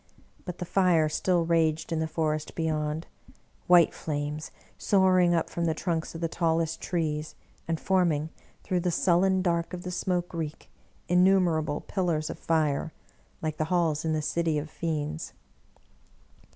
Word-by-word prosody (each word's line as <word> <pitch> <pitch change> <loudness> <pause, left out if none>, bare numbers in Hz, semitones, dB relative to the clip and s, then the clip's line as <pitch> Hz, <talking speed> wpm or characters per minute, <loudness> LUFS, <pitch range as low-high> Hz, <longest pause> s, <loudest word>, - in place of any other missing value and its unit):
But 180 -2 -6
the 180 - -4
fire 175 -4 +3
still 175 +2 +1
raged 160 -1 +1
in 165 - 0
the 160 - 0
forest 155 -1 -2
beyond 155 -1 -1 0.3
— - - -35
^white 175 -2 +7
flames^ 150 0 -4 0.3
soaring 185 -3 +3
up 165 - 0
from 170 - -2
the 160 -1 +1
trunks 165 -1 -2
of 165 - -6
the 165 - +1
tallest 165 -1 0
trees, 155 -3 -2 0.3
and 165 -1 -1
form 185 -3 +2
ing, 150 +1 -2 0.3
through 180 - 0
the 180 +1 0
sullen 185 +2 +2
dark 170 -1 0
of 175 - -8
the 180 - -4
smoke 180 -1 -1
reek, 160 -2 -5 0.4
innumer 180 -2 +4
able 150 -1 -3
pillars 170 -5 -1
of - - -9
fire, 155 -2 0 0.5
like 155 -1 -2
the 155 - 0
halls 160 -3 +1
in 160 -1 0
the 155 -1 -1
city 165 -1 0
of 150 +1 -4
fiends. 155 -1 -3
165 Hz, 165 wpm, -28 LUFS, 155-175 Hz, 0.5 s, ^white